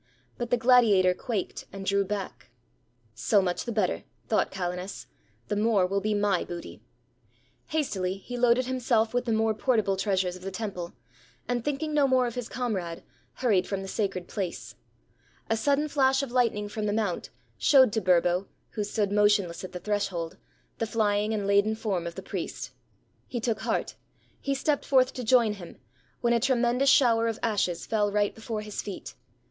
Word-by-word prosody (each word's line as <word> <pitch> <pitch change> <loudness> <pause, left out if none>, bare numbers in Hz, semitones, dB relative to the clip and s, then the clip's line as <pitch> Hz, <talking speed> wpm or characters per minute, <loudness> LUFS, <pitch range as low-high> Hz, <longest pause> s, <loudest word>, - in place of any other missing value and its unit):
But 240 -2 -4
the 245 - +3
gladiator 225 -7 +5
quaked, 200 +1 -4
and 195 0 -7
drew 200 +1 +2
back. 190 - -5 0.6
"So 160 - +2
much 180 -2 -1
the 240 - -3
better," 210 -5 0 0.2
thought 220 - +2
Calenus; 180 0 -4 0.4
"the - - -1
more 210 -2 +3
will 195 +2 -1
be 215 +1 0
my 205 -3 +1
booty." 175 -1 -8 0.9
Hastily 195 -12 -1
he 245 +5 -8
loaded 245 +1 +3
himself 240 -3 +1
with 245 0 0
the 235 - -1
more 220 0 +2
portable 215 -3 +1
treasures 190 -2 0
of 185 - -11
the 190 - -4
temple; 190 -4 -5 0.5
and 245 -1 -1
thinking 295 +3 -2
no 290 -2 +4
more 260 -1 +3
of 240 - -3
his 245 -1 -5
comrade, 190 -9 -3 0.3
hurried 205 -8 +2
from 195 -1 -3
the - - -7
sacred 190 -3 -2
place. 190 -5 -4 0.8
A - - +4
sudden 285 +6 +1
flash 270 -2 +2
of 270 - -5
lightning 230 -4 +1
from 210 0 -3
the 205 - 0
mount 210 -5 -1 0.3
showed 260 -7 +6
to 220 - +1
Burbo, 180 +1 +2 0.2
who 210 - -2
stood 205 -1 -1
motionless 205 -4 +2
at 185 - -7
the 180 - -6
threshold, 195 -5 -2 0.4
the 225 - 0
flying 210 -1 +1
and 210 -2 -1
laden 200 +2 +3
form 195 -6 -2
of 170 - -7
the - - -7
priest. - - -5 0.6
He 245 - -3
took 230 -1 -1
heart; - - -1 0.5
he 275 -1 -1
stepped 285 +1 0
forth 260 -1 +3
to 250 - -5
join 230 -2 +4
him, 180 -5 -10 0.4
when 235 -1 +3
a 235 - +3
tremendous 250 +1 +2
shower 230 -4 +5
of 225 -1 -2
ashes 200 -6 0
fell 210 -2 +1
right 205 0 +1
before 225 -1 -5
his 210 -1 -5
feet. 200 - -7
210 Hz, 180 wpm, -27 LUFS, 195-240 Hz, 0.9 s, showed